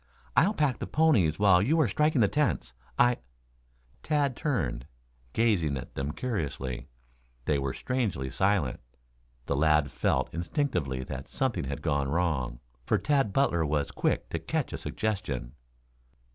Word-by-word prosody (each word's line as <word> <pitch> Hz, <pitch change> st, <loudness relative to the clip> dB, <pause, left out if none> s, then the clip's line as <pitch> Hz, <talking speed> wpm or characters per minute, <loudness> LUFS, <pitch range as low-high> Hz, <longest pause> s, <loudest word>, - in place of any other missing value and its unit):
I'll 205 Hz, +5 st, +4 dB
pack 145 Hz, -7 st, +1 dB
the -, -, -4 dB
ponies 135 Hz, -, +3 dB
while 95 Hz, -3 st, +5 dB
you 150 Hz, +10 st, +2 dB
are 150 Hz, -, +4 dB
striking 150 Hz, +5 st, +2 dB
the 105 Hz, -, +5 dB
tents. 100 Hz, -, 0 dB, 0.2 s
I 120 Hz, 0 st, +4 dB, 0.4 s
" -, -, -36 dB
Tad 145 Hz, -4 st, +1 dB
turned, 65 Hz, -, -1 dB, 0.4 s
gazing 90 Hz, -, +2 dB
at 65 Hz, -, -8 dB
them 70 Hz, +2 st, -3 dB
curiously. 75 Hz, -, -3 dB, 0.6 s
They 75 Hz, -2 st, +2 dB
were 70 Hz, -1 st, -2 dB
strangely 105 Hz, -, -2 dB
silent. 95 Hz, -5 st, +1 dB, 0.7 s
The 70 Hz, -, 0 dB
lad 75 Hz, -1 st, +3 dB
felt -, -, 0 dB
instinctively 85 Hz, -, -1 dB
that 65 Hz, +1 st, -6 dB
something 130 Hz, -, -1 dB
had 70 Hz, +2 st, -5 dB
gone 70 Hz, -4 st, 0 dB
wrong, 70 Hz, -7 st, 0 dB, 0.2 s
for -, -, +2 dB
Tad 140 Hz, -8 st, +1 dB
Butler 95 Hz, -10 st, +2 dB
was 75 Hz, -2 st, 0 dB
quick -, -, 0 dB
to -, -, -2 dB
catch -, -, -2 dB
a -, -, -4 dB
suggestion. 70 Hz, -, -3 dB
85 Hz, 145 wpm, -29 LUFS, -, 0.7 s, while